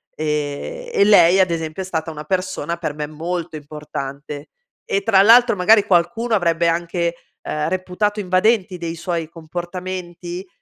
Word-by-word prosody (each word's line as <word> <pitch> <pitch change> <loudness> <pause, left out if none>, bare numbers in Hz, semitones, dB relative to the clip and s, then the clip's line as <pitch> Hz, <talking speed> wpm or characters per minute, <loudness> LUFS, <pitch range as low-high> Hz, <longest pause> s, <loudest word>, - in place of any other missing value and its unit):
e 150 - -3
e - - +4
lei 190 -3 +6
ad 185 -2 +2
esempio 160 +1 -3
è - - -8
stata 165 -3 -3
una 150 -1 -7
persona 185 0 -2
per 160 -3 -3
me 150 - -3
molto 165 +2 -4
importante 145 -1 -7 0.4
e, 200 - 0
tra 195 -4 +5
l'altro, 235 +2 +6
magari 210 +3 +5
qualcuno 200 +6 +1
avrebbe 170 -3 +2
anche, 170 0 -1 0.3
ehm, 150 0 -2
reputato 185 +3 -1
invadenti 185 +1 +2
dei 170 -1 -4
suoi 165 -1 -3
comportamenti, 175 +2 -6
175 Hz, 145 wpm, -20 LUFS, 160-190 Hz, 0.4 s, lei